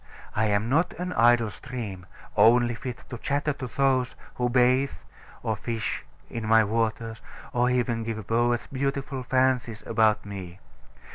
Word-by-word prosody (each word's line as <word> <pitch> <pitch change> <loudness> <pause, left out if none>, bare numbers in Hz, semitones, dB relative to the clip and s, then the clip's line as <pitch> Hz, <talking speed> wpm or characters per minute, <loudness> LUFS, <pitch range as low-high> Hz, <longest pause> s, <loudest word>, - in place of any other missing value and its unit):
I 110 - +2
am 105 +1 +1
not 160 +8 +2
an 180 +1 -4
idle 115 -3 +4
stream, 105 -7 -7 0.3
only 120 +1 +5
fit 125 +1 -6
to 120 - -5
chatter 145 +2 0
to 130 -2 -6
those 130 0 +1 0.2
who 125 0 0
bathe 130 +2 +3 0.5
or 110 - 0
fish 115 0 -3 0.2
in 115 -2 -5
my 110 0 +6
waters, 115 +1 -1 0.3
or 125 0 +3
even 120 -2 0
to 115 -1 -2
give 110 -2 -7
poets 120 +2 +1
beautiful 135 0 -2
fancies 125 -3 +1
about 110 -2 +2
me. 95 -3 -7
120 Hz, 150 wpm, -26 LUFS, 110-130 Hz, 0.5 s, my